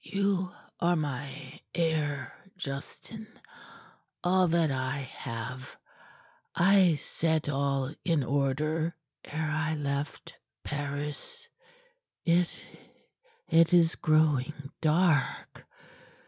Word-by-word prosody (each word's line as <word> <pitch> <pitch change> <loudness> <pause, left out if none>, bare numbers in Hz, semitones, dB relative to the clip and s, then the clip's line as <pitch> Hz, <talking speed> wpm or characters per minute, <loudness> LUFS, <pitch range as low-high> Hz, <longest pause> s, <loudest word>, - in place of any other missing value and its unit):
"You 195 -2 0 0.3
are 175 0 +3
my 145 -1 -4
heir, 155 -4 0 0.2
Justin. 185 +8 -7 1.0
All 185 0 +4
that 165 -2 +2
I 130 +1 -1 0.2
have 125 +2 -6 0.8
I 185 -2 +5
set 160 +1 -1
all 140 -1 0
in 165 -5 +2
order 150 +5 0 0.3
ere 155 0 -3
I 155 0 0
left 140 -1 -3 0.3
Paris. 145 - -4 0.8
It 170 0 +3 1.0
it 165 +1 +5
is 165 -1 +5
growing 150 -2 +1
dark. 160 -2 +1
155 Hz, 85 wpm, -29 LUFS, 140-170 Hz, 1.0 s, I